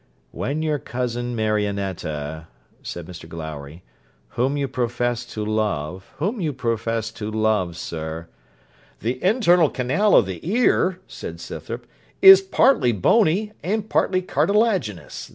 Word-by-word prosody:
'When 150 +4 -3
your 150 -2 0
cousin 120 -1 -3
Marionetta,' 95 -8 -2 0.3
said 85 -2 -7
Mr 85 -1 -10
Glowry, 80 -1 -8 0.5
'whom 130 +4 0
you 140 -1 -1
profess 120 -1 -1
to 110 -3 -5
love 100 -5 -2
whom 200 +8 -2
you 155 -4 -1
profess 115 -2 -2
to 110 -2 -6
love, 110 -6 0
sir 80 0 -5 0.4
' - - -32
'The 125 +4 -3
internal 180 - +4
canal 135 +12 +2
of 115 - +6
the 95 -2 -5
ear,' 190 -2 +2
said - - -8
Scythrop, - - -7 0.3
'is 385 0 +10
partly 265 - +3
bony 195 - +2
and 210 +3 -2
partly 185 -1 +2
cartilaginous. 180 - 0
120 Hz, 130 wpm, -22 LUFS, -, 0.5 s, is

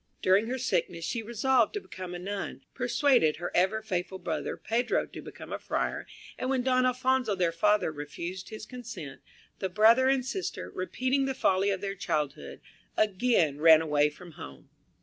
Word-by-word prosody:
During 195 +4 +4
her 255 +2 -2
sickness 170 -9 -1
she 230 - -2
resolved 235 - +2
to - - 0
become 185 - -8
a - - -3
nun, 195 +3 -5
persuaded 245 - +3
her 175 - -5
ever 190 +5 +2
faithful 190 -2 -3
brother, 165 -5 -3
Pedro, 240 +2 0
to - - -10
become - - -9
a - - -3
friar, - - -2 0.3
and 255 - -2
when 260 -2 +1
Don 255 0 +3
Alphonso, 255 -3 +1
their 175 -3 +1
father, 210 +2 +2
refused 160 +5 -6
his 215 -1 -8
consent, 215 - -8 0.4
the 190 - -2
brother 225 +7 +5
and 265 -2 +2
sister, 375 +8 -4
repeating 255 +9 0
the 270 -1 -2
folly 190 -1 +2
of 195 -2 -1
their 200 -1 -3
childhood, 150 -6 -3 0.4
again 190 - +2
ran 160 -1 +8
away 150 -2 +2
from 175 +3 -13
home. 70 - -11
200 Hz, 170 wpm, -29 LUFS, 175-250 Hz, 0.4 s, ran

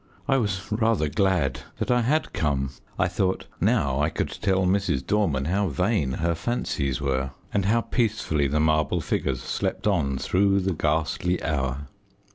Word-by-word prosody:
I 135 -1 +3
was 100 -5 -1
rather 110 -6 +2
glad 85 - +1 0.2
that - - -1
I 125 0 +4
had 150 +7 0
come. 70 -3 0 0.3
I - - +2
thought 95 +1 -1
now 65 -1 +2
I 75 +2 +2
could - - -2
tell 95 0 0
Mrs. 90 -8 +1
Dorman 80 -10 +1
how 100 +5 +1
vain 85 - 0
her 85 +4 0
fancies 80 - -2
were, 70 -1 -1 0.2
and 100 -2 +1
how 115 +3 +3
peacefully 110 - 0
the 75 +3 0
marble 80 +2 +2
figures 65 -3 -1
slept 95 +2 -2
on 80 -10 +1
through 100 +6 +2
the 95 0 0
ghastly 80 +3 0
hour. 70 -2 -1
85 Hz, 160 wpm, -25 LUFS, 70-100 Hz, 0.3 s, I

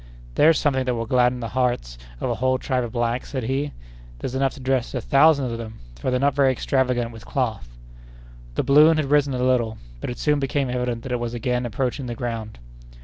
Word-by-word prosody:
"There's 155 - +5
something 130 -3 +1
that 125 -1 0
will 115 0 -2
gladden 125 +1 +2
the 115 - -4
hearts 120 - -1 0.2
of - - -2
a - - 0
whole 130 0 +2
tribe 130 -1 -1
of 120 - -5
blacks," 120 +1 -1
said 130 -3 -3
he; 135 +4 -1 0.5
"there's 125 - -5
enough 135 0 0
to - - -11
dress 130 -1 -1
a - - 0
thousand 140 +3 +4
of 115 - -4
them, 110 -1 -7 0.2
for - - -1
they're 125 0 +1
not 140 +1 +2
very 135 -1 +4
extravagant 125 -2 0
with 115 -1 -11
cloth." 110 - -2 0.9
The - - +1
balloon 150 +3 +6
had 145 -3 -1
risen 145 -2 +3
a 125 - -1
little, 120 -3 +1 0.2
but - - -4
it 120 - -5
soon 150 -1 +1
became 135 -1 -1
evident 125 -2 -2
that 130 - -6
it 125 - 0
was 120 0 -3
again 125 +1 -1
approaching 125 +3 -2
the 120 - -4
ground. 115 -3 -5
125 Hz, 220 wpm, -23 LUFS, 120-135 Hz, 0.9 s, balloon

